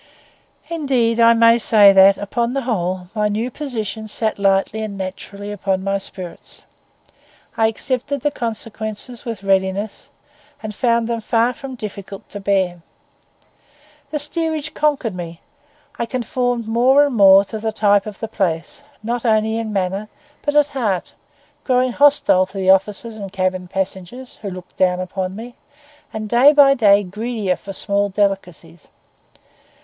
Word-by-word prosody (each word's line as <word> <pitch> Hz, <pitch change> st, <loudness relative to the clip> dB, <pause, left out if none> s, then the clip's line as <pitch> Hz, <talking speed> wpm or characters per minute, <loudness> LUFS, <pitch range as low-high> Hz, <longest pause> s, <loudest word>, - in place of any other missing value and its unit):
Indeed 260 Hz, -8 st, 0 dB
I 230 Hz, 0 st, +7 dB
may 230 Hz, +1 st, +5 dB
say 210 Hz, -3 st, +6 dB
that, 195 Hz, +1 st, +6 dB
upon 235 Hz, +4 st, -2 dB
the 275 Hz, -1 st, -2 dB
whole, 185 Hz, -6 st, -2 dB
my 210 Hz, -2 st, +1 dB
new 220 Hz, +4 st, -2 dB
position 225 Hz, -6 st, -5 dB
sat 215 Hz, 0 st, -2 dB
lightly 195 Hz, +2 st, +1 dB
and 210 Hz, -2 st, -5 dB
naturally 200 Hz, +2 st, -6 dB
upon 190 Hz, -2 st, -2 dB
my 195 Hz, 0 st, 0 dB
spirits. 180 Hz, -3 st, -10 dB, 0.9 s
I 225 Hz, -, +3 dB
accepted 255 Hz, +4 st, -3 dB
the 295 Hz, -, 0 dB
consequences 225 Hz, -1 st, -5 dB
with 225 Hz, -5 st, -5 dB
readiness, 195 Hz, +1 st, -1 dB, 0.5 s
and 215 Hz, -1 st, -5 dB
found 235 Hz, +1 st, +1 dB
them 230 Hz, -1 st, -2 dB
far 230 Hz, +3 st, +1 dB
from 265 Hz, +1 st, -8 dB
difficult 200 Hz, -3 st, -8 dB
to 205 Hz, -, -7 dB
bear. 190 Hz, -3 st, 0 dB, 1.3 s
The 300 Hz, -, -2 dB
steerage 310 Hz, 0 st, -2 dB
conquered 285 Hz, -8 st, 0 dB
me; 170 Hz, -2 st, -7 dB, 0.6 s
I 235 Hz, -, -1 dB
conformed 245 Hz, -1 st, -2 dB
more 255 Hz, +5 st, +4 dB
and 280 Hz, -4 st, -3 dB
more 195 Hz, -1 st, +7 dB
to 220 Hz, +2 st, -6 dB
the 220 Hz, +1 st, -2 dB
type 205 Hz, -1 st, +2 dB
of 210 Hz, -1 st, -7 dB
the 225 Hz, -, -4 dB
place, 185 Hz, -, -2 dB, 0.2 s
not 235 Hz, +1 st, -2 dB
only 220 Hz, -1 st, +1 dB
in 225 Hz, -1 st, -4 dB
manner 195 Hz, +1 st, -2 dB, 0.3 s
but 290 Hz, 0 st, -2 dB
at 295 Hz, -1 st, +4 dB
heart, 220 Hz, -10 st, -2 dB, 0.5 s
growing 255 Hz, -1 st, +2 dB
hostile 275 Hz, -9 st, +4 dB
to 195 Hz, -, -11 dB
the 190 Hz, -1 st, +4 dB
officers 210 Hz, +4 st, 0 dB
and 200 Hz, -2 st, -7 dB
cabin 185 Hz, -1 st, -2 dB
passengers 190 Hz, +7 st, -5 dB
who 205 Hz, -, -4 dB
looked 185 Hz, -1 st, -11 dB
down 180 Hz, -1 st, +2 dB
upon 185 Hz, 0 st, -4 dB
me, 235 Hz, +3 st, -9 dB, 0.6 s
and 215 Hz, 0 st, -5 dB
day 245 Hz, +7 st, +6 dB
by 280 Hz, -2 st, +6 dB
day 205 Hz, -5 st, +4 dB
greedier 210 Hz, 0 st, -2 dB
for 195 Hz, -, -9 dB
small 200 Hz, +1 st, -1 dB
delicacies. 185 Hz, -5 st, -3 dB
215 Hz, 150 wpm, -19 LUFS, 195-240 Hz, 1.3 s, I